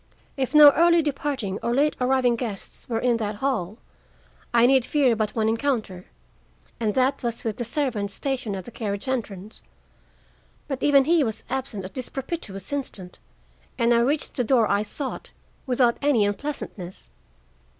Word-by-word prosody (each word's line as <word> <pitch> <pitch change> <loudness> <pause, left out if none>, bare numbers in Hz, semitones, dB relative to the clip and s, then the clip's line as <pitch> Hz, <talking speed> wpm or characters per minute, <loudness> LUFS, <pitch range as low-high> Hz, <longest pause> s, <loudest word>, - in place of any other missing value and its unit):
If 270 +2 -2
no 295 -1 +10
early 340 +2 +4
departing 275 -9 -2
or 235 - 0
late 295 +3 +2
arriving 250 -1 +3
guests 225 -3 -7
were 230 - 0
in 240 0 +2
that 215 -2 -3
hall, 215 -5 -2 0.7
I 235 0 +5
need 265 0 +4
fear 265 -3 +2
but 215 -1 -2
one 220 -1 +1
encounter, 225 -6 -1 0.7
and 215 -3 -1
that 260 +1 +2
was 235 -1 -3
with 220 -3 -3
the 240 - -2
servant 235 -5 -1
stationed 250 -2 -3
at 190 -2 -6
the - - -10
carriage 205 -1 -4
entrance. 215 -5 -4 1.1
But 270 -2 -4
even 280 -2 +5
he 330 0 +4
was 220 -4 -3
absent 250 -8 -3
at 185 - -9
this 255 -2 -5
propitious 260 - -6
instant, 200 -10 -3 0.6
and 235 0 +3
I 235 - +4
reached 285 +5 0
the 250 - +2
door 235 -2 +3
I 200 0 +2
sought 260 +6 -5 0.4
without 245 -2 +2
any 275 -8 +3
unpleasantness. 205 -5 -5
240 Hz, 160 wpm, -24 LUFS, 210-275 Hz, 1.1 s, no